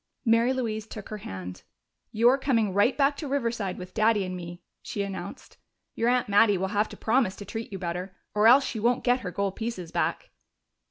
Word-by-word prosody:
Mary 230 +2 +4
Louise 225 -4 -2
took 215 -2 -9
her 215 - -5
hand. 95 - -7 0.5
"You're 240 +5 +4
coming 230 -8 +1
right 205 +7 +3
back 285 0 +3
to 300 - -5
Riverside 235 -8 -2
with 180 -1 -9
Daddy 215 -2 +2
and 185 0 -5
me," 175 0 -8 0.2
she 200 - -3
announced. 195 -1 -7 0.4
"Your 230 - +1
aunt 250 0 +2
Mattie 205 0 +4
will 190 +1 -2
have 210 +1 0
to - - -10
promise 225 -4 +1
to 205 - -9
treat 225 +1 -6
you 195 - -4
better, 180 +1 -5 0.2
or 210 +1 +4
else 265 +4 +7
she 225 - -4
won't 240 +3 +1
get 250 +1 +3
her 200 - -5
gold 195 +1 -2
pieces 220 -7 -5
back!" - - -2
215 Hz, 205 wpm, -27 LUFS, 190-240 Hz, 0.5 s, else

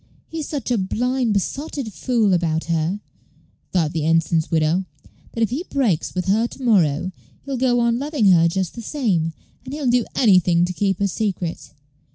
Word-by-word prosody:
"He's 320 -3 -5
such 275 -5 -3
a 235 - +2
blind, 245 +5 0
besotted 270 - -3
fool 225 -5 +1
about 165 -2 +1
her," 170 +4 -1 0.7
thought 165 -4 +1
the 160 -2 -1
ensign's 165 0 +2
widow, 165 +3 +1 0.5
"that 230 - 0
if 225 - 0
he 285 +8 -2
breaks 225 - 0
with 180 - -1
her 220 +5 +2
to 265 - -11
morrow, 185 - +2 0.3
he'll 275 -1 -4
go 245 -1 +2
on 235 0 +2
loving 280 -8 +2
her 170 -2 +5
just 185 +1 -2
the 235 - -7
same, 205 - 0 0.3
and 265 +2 -6
he'll 295 -2 -4
do 245 -1 +3
anything 180 -6 +4
to 180 - -4
keep 195 0 0
her 200 - +1
secret. 190 -4 -3
200 Hz, 180 wpm, -21 LUFS, 170-245 Hz, 0.7 s, her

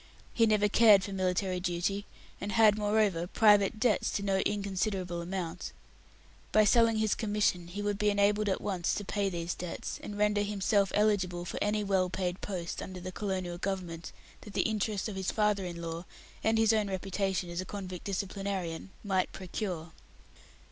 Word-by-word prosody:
He 230 -1 +4
never 210 -1 +3
cared 210 -2 +6
for 200 - -5
military 185 0 0
duty, 180 +3 -1 0.3
and 205 +1 -3
had, 220 -2 +6
moreover, 205 -5 +1
private 205 +1 +4
debts 220 -2 +2
to 200 - -1
no 195 -1 +1
inconsiderable 190 -3 -1
amount. 175 -1 -4 0.8
By 215 - +6
selling 230 0 +4
his 215 -1 +2
commission 205 -5 0
he 200 +4 -5
would 205 -1 -1
be 210 0 +3
enabled 205 +1 +2
at 190 - -1
once 185 -4 -1
to 205 - -4
pay 200 0 0
these 170 -1 -3
debts, 180 -1 -5
and 205 - -7
render 210 0 +2
himself 200 -1 +1
eligible 185 -4 +1
for - - -4
any 210 0 +1
well 190 -2 +1
paid 180 0 -3
post 180 -4 -4
under 185 -1 -7
the 185 +1 -6
Colonial 185 -3 -3
Government 180 -4 -4 0.3
that 210 - -11
the - - +2
interest 215 -2 -1
of 210 - -5
his 190 -1 -2
father 210 -3 +1
in 170 -1 -6
law, 165 +1 -5 0.4
and 220 0 +3
his 225 0 +4
own 215 -2 +1
reputation 190 -1 -2
as 170 +1 -2
a - - -6
convict 185 -2 -6
disciplinarian, 195 -3 -3
might 190 -3 0
procure. 180 -3 -5
195 Hz, 175 wpm, -30 LUFS, 180-210 Hz, 0.8 s, cared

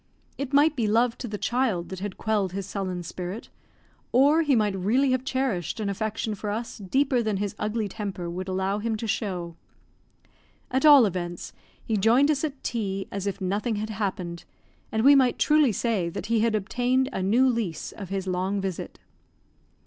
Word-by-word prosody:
It 275 -1 -4
might 295 +2 +4
be 230 -5 0
love 230 +2 +2
to 245 - -4
the 210 -2 -4
child 225 -7 0
that 190 - -6
had 200 -1 -5
quelled 205 -4 0
his 195 0 -3
sullen 185 -3 -4
spirit, 180 +6 -6 0.6
or 285 +6 +5
he 290 -4 +3
might 210 -3 +2
really 240 +9 +2
have 255 0 +1
cherished 260 - -2
an 210 -2 -1
affection 220 +2 -2
for 210 +1 -5
us 225 +2 -4
deeper 255 +6 +1
than 215 -3 -1
his 200 0 -2
ugly 215 0 -1
temper 195 -4 -5
would 180 +2 -5
allow 190 +2 -1
him 225 +1 -1
to 215 - -5
show. 185 -5 -3 1.2
At 265 +4 +3
all 285 -5 +9
events, 175 -3 -4 0.3
he 220 - 0
joined 240 +9 +4
us 285 -1 -1
at 285 -3 -4
tea 195 -4 -2
as 200 0 -3
if 200 -1 -3
nothing 205 +4 -1
had 215 +1 -3
happened, 185 -5 -3 0.5
and 220 0 0
we 280 +2 +8
might 260 -3 +4
truly 300 -4 +4
say 210 -5 0
that - - -6
he 230 0 +1
had 225 0 +2
obtained 245 +5 +1
a - - -2
new 230 +8 +3
lease 230 -10 -2
of 195 -4 -9
his 195 -1 -3
long 185 +2 -1
visit. 190 -3 -5
215 Hz, 185 wpm, -26 LUFS, 190-245 Hz, 1.2 s, all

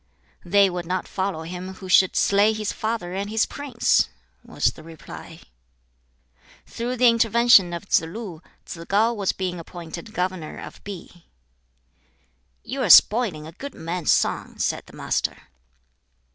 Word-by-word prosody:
"They 200 +3 +4
would 175 -2 -5
not 185 +1 -2
follow 190 -4 -3
him 180 +3 -7
who 190 - -10
should 185 +1 +4
slay 205 +2 +3
his 215 -2 -3
father 220 -5 -3
and 200 +2 -3
his 220 0 +2
prince!" 275 -5 +1 0.3
was - - 0
the - - -13
reply. 160 -1 -11 1.2
Through 240 +2 -4
the 250 0 +5
intervention 230 -4 +5
of 170 -1 -5
Tsz - - +4
lu, 170 0 -7 0.2
Tsz 165 - -8
kau 220 +4 +3
was 200 -4 0
being 180 -2 -4
appointed 170 +5 -9
governor 180 -5 -3
of - - -10
Pi. 180 -3 -10 1.4
"You 270 +1 -4
are - - 0
spoiling 205 -9 +6
a 160 - -9
good 275 - -9
man's 170 +1 -1
son," - - 0
said - - -2
the - - -16
Master. - - -2
190 Hz, 145 wpm, -23 LUFS, 175-220 Hz, 1.4 s, spoiling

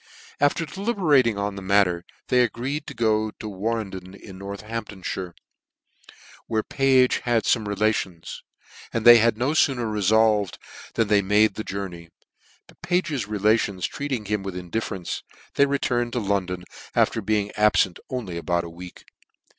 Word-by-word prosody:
After 145 +4 +2
deliberating 155 - +2
on 100 0 -2
the 100 - -7
matter, 95 -3 +2 0.3
they 125 -1 +4
agreed 130 +6 -2
to 140 - -7
go 110 -2 +1
td 110 - -6
Warnden 95 -3 -4
in 95 -2 -12
Northampfhire, 100 -2 -6 1.1
where 110 -1 0
Page 130 -2 +3
had 120 -2 +1
fome 110 -3 +1
relations: 100 -4 -2 0.5
and 115 - -2
they 120 0 +10
had 115 0 +3
no 130 +5 +1
fooner 125 -8 +1
refolved 105 -1 +2 0.4
than 115 -2 +2
they 105 -1 +4
made 105 +2 +3
the 110 - -5
journey: 90 -5 -6 0.6
but - - -22
Page's 155 - -1
re 105 0 -3
lations 100 -3 +1
treating 135 -6 -3
him 105 0 -1
with 95 -2 -6
indifference, 90 0 -4 0.3
they 140 - +4
re 140 0 +1
turned 120 -3 -1
to 125 - 0
London 95 -4 -1 0.3
after 115 - +2
being 105 0 0
abfent 105 -4 +3
only 100 -10 -4
aboui 85 0 0
a 85 - -7
week. 90 +2 -11
105 Hz, 150 wpm, -24 LUFS, 95-120 Hz, 1.1 s, they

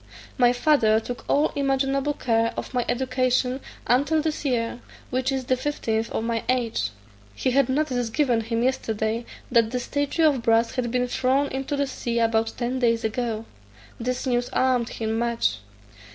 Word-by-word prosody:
"My 245 -1 +5
father 245 -5 +3
took 245 +2 -6
all 295 +2 +3
imaginable 275 +1 +1
care 230 -3 0
of - - -5
my 250 -1 +1
education 255 0 +1 0.3
until 285 +6 +3
this 310 0 -2
year, 240 -3 -1 0.3
which 255 +1 0
is 265 -1 -2
the 255 - +2
fifteenth 230 -5 -2
of - - -2
my 230 -1 -1
age. 235 - 0 0.5
He 255 - 0
had 270 0 +3
notice 260 -4 0
given 240 -2 +2
him 230 +1 -1
yesterday, 225 -2 -1 0.2
that 230 -2 +4
the 250 +2 -2
statue 285 +5 -1
of 285 -5 +3
brass 230 0 +3
had 250 -2 -1
been 250 +1 0
thrown 260 +3 +1
into 270 +2 -3
the 280 0 +1
sea 240 -3 -3
about 225 -1 +2
ten 250 +1 -1
days 230 -2 +2
ago. 225 0 -2 0.5
This 250 +3 -2
news 245 -1 0
alarmed 255 -2 +2
him 220 0 -2
much. 230 - 0
245 Hz, 165 wpm, -24 LUFS, 230-265 Hz, 0.5 s, My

